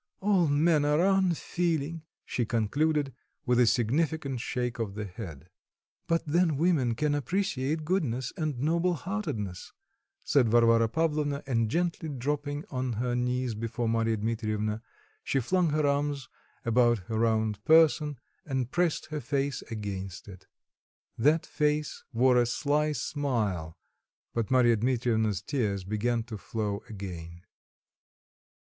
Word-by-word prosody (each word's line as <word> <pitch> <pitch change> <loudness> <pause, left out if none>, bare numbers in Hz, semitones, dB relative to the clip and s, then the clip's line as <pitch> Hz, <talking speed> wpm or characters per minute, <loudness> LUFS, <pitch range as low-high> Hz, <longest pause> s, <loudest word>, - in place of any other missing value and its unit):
All 190 -4 +3
men 150 +1 +3
are 150 +4 +3
unfeeling," 170 -4 0 0.2
she 120 - -1
concluded, 140 +6 0 0.3
with 125 -1 +3
a 125 - +5
significant 140 +3 +1
shake 125 -1 -3
of 105 -4 -3
the 105 0 -4
head. 90 - -8 0.6
"But 165 0 +1
then 160 -1 +2
women 145 -8 +2
can 150 +4 +1
appreciate 155 - -1
goodness 135 -9 -1
and 155 -5 -2
noble 170 +6 +1
heartedness," 125 - -4 0.5
said 130 -5 +3
Varvara 115 0 +4
Pavlovna, 150 -1 0
and 115 -5 +1
gently 170 +2 -1
dropping 145 +2 -3
on 130 -2 -2
her 120 +3 -1
knees 125 0 0
before 115 +2 -3
Marya 115 0 +1
Dmitrievna, 110 -1 -2 0.4
she 135 - +1
flung 175 +7 +1
her 150 0 +1
arms 140 -2 0 0.4
about 120 0 +4
her 110 +2 -2
round 110 -2 +1
person, 155 -2 +4 0.3
and 130 -3 -2
pressed 175 -2 +1
her 150 -1 -3
face 140 +1 -1
against 100 -4 -5
it. 95 -3 -12 0.7
That 150 +7 +3
face 150 0 -1
wore 125 +1 +4
a 120 -1 +4
sly 150 +4 +1
smile, 110 - -2 0.6
but 115 -3 -1
Marya 120 -3 +4
Dmitrievna's 110 -4 +1
tears 105 -10 -1
began 115 +4 -1
to 110 -3 -8
flow 105 -2 -3
again. 85 -4 -8
125 Hz, 130 wpm, -29 LUFS, 115-150 Hz, 0.7 s, a